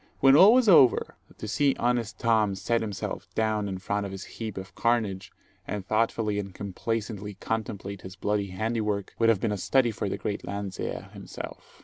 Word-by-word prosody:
When 135 Hz, 0 st, +6 dB
all 195 Hz, +9 st, +8 dB
was 255 Hz, -3 st, +4 dB
over, 145 Hz, -, +6 dB, 0.2 s
to -, -, -6 dB
see 135 Hz, +6 st, +2 dB
honest 120 Hz, -2 st, 0 dB
Tom 110 Hz, -4 st, +2 dB
set 115 Hz, +5 st, 0 dB
himself 105 Hz, -4 st, -4 dB
down 110 Hz, -2 st, 0 dB
in 95 Hz, -, -3 dB
front 105 Hz, +2 st, -2 dB
of 100 Hz, -, -5 dB
this 95 Hz, -1 st, -6 dB
heap 110 Hz, -1 st, -7 dB
of 95 Hz, 0 st, -7 dB
carnage, 105 Hz, -6 st, 0 dB, 0.4 s
and 100 Hz, -1 st, -4 dB
thoughtfully 110 Hz, -1 st, 0 dB
and 100 Hz, -2 st, -6 dB
complacently 105 Hz, 0 st, -4 dB
contemplate 100 Hz, -2 st, -4 dB
his 95 Hz, +1 st, -9 dB
bloody 105 Hz, +1 st, -1 dB
handiwork, 105 Hz, +1 st, -2 dB
would 115 Hz, 0 st, +4 dB
have 110 Hz, -4 st, +4 dB
been 110 Hz, -, 0 dB
a 105 Hz, -, -1 dB
study 120 Hz, +5 st, +2 dB
for 105 Hz, -2 st, -3 dB
the -, -, -2 dB
great 100 Hz, +1 st, -3 dB
Landseer 100 Hz, 0 st, -5 dB
himself. -, -, -9 dB
105 Hz, 185 wpm, -27 LUFS, 100-115 Hz, 0.4 s, all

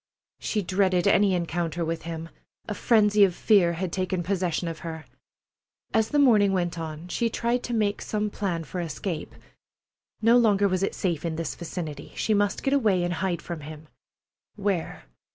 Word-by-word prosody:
She 210 Hz, -2 st, -1 dB
dreaded 185 Hz, -1 st, +1 dB
any 200 Hz, -1 st, +4 dB
encounter 170 Hz, -1 st, -2 dB
with 165 Hz, 0 st, -3 dB
him. 165 Hz, 0 st, -6 dB, 0.4 s
A 210 Hz, -, -2 dB
frenzy 210 Hz, -1 st, +4 dB
of 185 Hz, -3 st, +3 dB
fear 185 Hz, -6 st, +4 dB
had 175 Hz, +1 st, -3 dB
taken 185 Hz, -1 st, -1 dB
possession 180 Hz, -2 st, -1 dB
of 165 Hz, -2 st, -5 dB
her. 160 Hz, -1 st, -7 dB, 0.9 s
As 220 Hz, 0 st, +2 dB
the 295 Hz, -, 0 dB
morning 215 Hz, -8 st, +5 dB
went 175 Hz, -2 st, -1 dB
on, 160 Hz, +1 st, -6 dB
she 230 Hz, +6 st, 0 dB
tried 235 Hz, +2 st, 0 dB
to 240 Hz, -, -4 dB
make 210 Hz, -2 st, 0 dB
some 210 Hz, -1 st, -2 dB
plan 180 Hz, -6 st, -2 dB
for 175 Hz, +4 st, -5 dB
escape. 165 Hz, 0 st, -4 dB, 0.8 s
No 230 Hz, +2 st, +5 dB
longer 205 Hz, -3 st, +4 dB
was 185 Hz, -1 st, 0 dB
it 195 Hz, -, -1 dB
safe 170 Hz, -6 st, -1 dB
in 165 Hz, -2 st, -2 dB
this 165 Hz, -1 st, -3 dB
vicinity. 160 Hz, -4 st, -6 dB
She 220 Hz, -, +1 dB
must 205 Hz, -1 st, +1 dB
get 275 Hz, -, +1 dB
away 210 Hz, -10 st, +3 dB
and 175 Hz, 0 st, -1 dB
hide 175 Hz, -1 st, -2 dB
from 170 Hz, -2 st, -5 dB
him. 155 Hz, +1 st, -10 dB, 0.7 s
Where? 195 Hz, -, -2 dB
185 Hz, 175 wpm, -26 LUFS, 165-205 Hz, 0.9 s, morning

